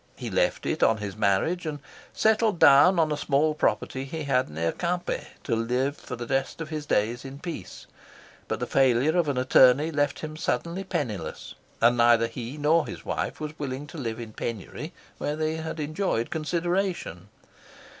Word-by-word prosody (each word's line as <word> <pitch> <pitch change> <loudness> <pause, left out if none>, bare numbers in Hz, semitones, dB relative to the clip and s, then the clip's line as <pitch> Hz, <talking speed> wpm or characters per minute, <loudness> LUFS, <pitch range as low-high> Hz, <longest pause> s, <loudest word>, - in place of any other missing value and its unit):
He - - -6
left - - +1
it - - -1
on 110 - +4
his 100 -2 -5
marriage, 110 - +1
and 150 -1 -3 0.3
settled 220 -2 +2
down 155 +6 +7
on 160 -2 +2
a - - +1
small 150 +1 +1
property 135 -3 -1
he 155 +3 -5
had 130 -2 +1
near 80 +2 -1
Quimper 175 0 -2 0.2
to - - 0
live 125 +5 0
for 125 - -7
the 120 0 -6
rest 135 +5 -1
of 160 -1 -5
his 155 -2 -5
days 115 +2 0
in 135 0 -8
peace; 150 - -7 0.6
but - - -2
the - - -1
failure 135 +4 +3
of 175 -3 +2
an 140 - -1
attorney 130 +4 +5
left 145 -2 0
him 155 0 -6
suddenly 170 +2 -2
penniless, 120 - -4 0.3
and 120 +1 +5
neither 120 -1 +5
he 115 +4 -6
nor 150 +2 +3
his - - -8
wife - - -3
was 155 0 -5
willing 140 0 -4
to 150 +2 -9
live 115 -4 -4
in 115 -2 -8
penury 120 - -5 0.3
where 145 - -2
they 155 +1 -1
had 160 0 -5
enjoyed 150 - -1
consideration. 170 - -2
145 Hz, 180 wpm, -26 LUFS, 120-160 Hz, 0.6 s, down